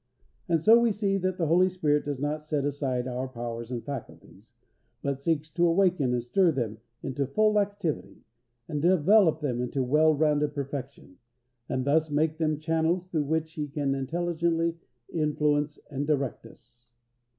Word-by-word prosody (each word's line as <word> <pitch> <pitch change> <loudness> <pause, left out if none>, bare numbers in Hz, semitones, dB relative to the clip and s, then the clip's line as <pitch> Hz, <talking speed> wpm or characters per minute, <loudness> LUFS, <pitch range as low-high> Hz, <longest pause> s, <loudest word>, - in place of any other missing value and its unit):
And 165 - +3
so 225 +9 +6
we 235 -1 +3
see 200 -1 0
that 185 0 -1
the 170 - 0
Holy 180 +4 +4
Spirit 150 -5 0
does 145 -2 -3
not 150 +2 -2
set 150 -2 -2
aside 130 -3 -2
our 130 +1 -3
powers 120 -2 -6
and 120 -2 -5
faculties, 140 -5 -9 0.5
but 140 -1 -2
seeks 155 0 -1
to 175 +1 +2
awaken 170 -6 +2
and 120 -1 0
stir 170 +9 +3
them 115 -7 -3 0.2
into 135 +1 -2
full 210 +8 +3
activity, 200 -6 -3 0.4
and 150 -2 -3
develop 175 0 +4
them 125 -5 -1
into 125 +2 -1
well 155 +4 +4
rounded 150 -1 +1
perfection, 140 -7 -6 0.5
and 130 -1 -1
thus 155 +2 +2
make 155 +2 0
them 155 -2 +1
channels 165 +3 0
through 155 -5 0
which 160 +2 -1
He 150 -2 -3
can 140 -1 -1
intelligently 165 +3 -1 0.3
influence 150 -1 0
and 145 +1 -3
direct 140 -6 -1
us. 120 0 -21
150 Hz, 160 wpm, -27 LUFS, 135-165 Hz, 0.5 s, so